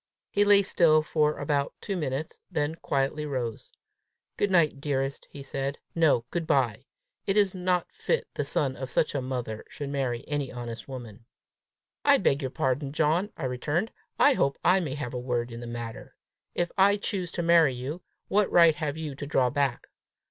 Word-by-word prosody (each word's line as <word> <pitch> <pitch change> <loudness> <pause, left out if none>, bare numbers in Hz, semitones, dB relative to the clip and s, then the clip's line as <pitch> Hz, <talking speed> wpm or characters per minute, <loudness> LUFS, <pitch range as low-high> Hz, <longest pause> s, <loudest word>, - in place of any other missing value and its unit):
He 205 - +3
lay 205 -1 +6
still 155 -5 +4
for 150 -1 +1
about 145 -1 -1
two 200 - -3
minutes, 150 -2 -3
then 150 +1 -1
quietly 140 -1 -1
rose. 125 -6 -4 0.7
"Good 205 - +1
night, 155 -6 +3
dearest!" 135 -1 -2
he 140 - -9
said; 135 +1 -3
" - - -47
no; 155 -8 +3
good 170 -2 -2
bye! 125 -2 +1 0.4
It 195 +1 +2
is 200 -3 +4
not 180 -1 0
fit 485 - -1
the - - -1
son 135 -3 0
of 130 -1 -6
such 150 - +1
a 140 - -1
mother 125 -4 -4
should 145 -1 -6
marry 130 -3 -2
any 145 -3 -2
honest 120 -2 -7
woman." 120 -4 -9 0.8
"I - - +6
beg 140 +2 +1
your 130 - -2
pardon, 135 +2 -1
John!" 160 +7 +1
I - - -6
returned; 145 - -1 0.3
"I 285 - +6
hope 140 - +1
I 185 +2 +5
may 150 -7 -3
have 140 -4 -5
a 125 - -2
word 120 -1 -2
in 115 - -7
the 120 - -7
matter! 120 -1 -7 0.4
If 175 -1 0
I 200 +2 +6
choose 195 -4 -2
to 175 - -2
marry 165 -5 +5
you, 140 +8 -5 0.3
what 205 0 +2
right 170 -2 +7
have 150 0 -3
you 155 -3 -4
to 145 +1 -7
draw 125 -3 +2
back? 140 -4 0
145 Hz, 190 wpm, -27 LUFS, 130-170 Hz, 0.8 s, right